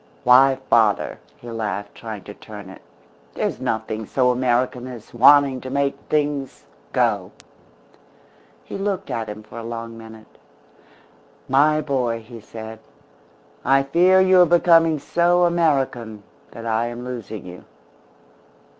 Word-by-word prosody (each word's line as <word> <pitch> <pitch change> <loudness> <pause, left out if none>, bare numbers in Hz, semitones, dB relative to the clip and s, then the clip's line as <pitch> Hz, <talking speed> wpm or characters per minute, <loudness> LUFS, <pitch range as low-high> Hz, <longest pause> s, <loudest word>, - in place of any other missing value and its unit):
Why 130 +2 +6
father," 110 -3 +2 0.2
he 120 - -10
laughed, 105 -2 -4
trying 110 -4 -8
to - - -10
turn - - -11
it, - - -14 0.5
"there's - - -2
nothing 110 -1 -3
so 125 -2 +2
American 125 0 0
as 120 -4 -11
wanting 135 +1 +5
to 130 - -7
make 140 +1 0
things 145 -3 -2 0.3
go." - - 0 1.3
He - - -7
looked 195 -1 -3
at 115 -2 -3
him 105 +1 -8
for 110 +2 -10
a - - -7
long 115 0 -6
minute. 110 -1 -14 1.1
"My 150 +3 +3
boy," 125 -6 -1
he 115 +1 -12
said, 110 +1 -9 0.8
"I 135 0 +3
fear 175 +7 +4
you 190 -1 +5
are 175 - +6
becoming 165 -1 +4
so 175 +4 +2
American 135 -10 0 0.3
that 115 - -10
I 115 +1 0
am 120 +1 -7
losing 115 -5 -7
you." 90 0 -11
125 Hz, 135 wpm, -21 LUFS, 115-145 Hz, 1.3 s, Why